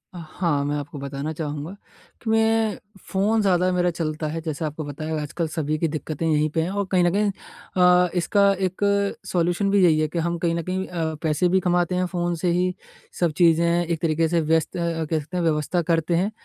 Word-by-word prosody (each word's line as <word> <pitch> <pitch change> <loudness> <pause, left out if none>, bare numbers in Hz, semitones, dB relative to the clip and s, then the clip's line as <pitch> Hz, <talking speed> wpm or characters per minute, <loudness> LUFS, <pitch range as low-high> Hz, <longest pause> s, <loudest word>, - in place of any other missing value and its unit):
हाँ, 160 -3 -2
मैं 145 +1 -1
आपको 145 0 -5
बताना 140 +2 -4
चाहूँगा 150 +1 -5 0.5
कि 225 - -4
मैं 225 -1 +2 0.3
फ़ोन 210 +3 +2
ज़्यादा 185 -2 +2
मेरा 180 0 +2
चलता 155 -1 -3
है 160 +2 -4
जैसे 155 0 -3
आपको 155 +1 -4
बताया 155 +2 -4
आजकल 160 +3 -3
सभी 155 -1 -2
की 165 - +1
दिक्कतें 155 +1 -4
यहीं 155 0 +2
पे 160 - +3
हैं। 170 - -1
और 200 0 -1
कहीं 180 -2 +3
न 175 - +3
कहीं 205 0 +2 0.5
अ, 180 0 +5
इसका 200 +3 +3
एक 190 +1 -2 0.4
सॉल्यूशन 175 +3 0
भी 200 -2 +4
यही 155 -3 +5
है 155 - +1
कि 170 +2 -3
हम 170 +1 -1
कहीं 170 0 0
न 170 - -1
कहीं 185 +2 -2
अ, 160 -3 -3
पैसे 160 +3 +2
भी 190 +1 +3
कमाते 180 0 +1
हैं 180 0 +1
फ़ोन 175 -1 -2
से 170 +2 0
ही 180 +1 +1 0.5
सब 170 -3 +2
चीज़ें 170 0 +3
एक 165 -1 -2
तरीके 165 0 +1
से 165 0 +1
व्यस्त 160 +2 0
अ, 165 -2 -1
कह 155 0 0
सकते 155 +5 -6
हैं 175 - 0
व्यवस्था 160 +2 +1
करते 165 +1 +1
हैं। 195 +5 +1
170 Hz, 215 wpm, -23 LUFS, 155-180 Hz, 0.5 s, अ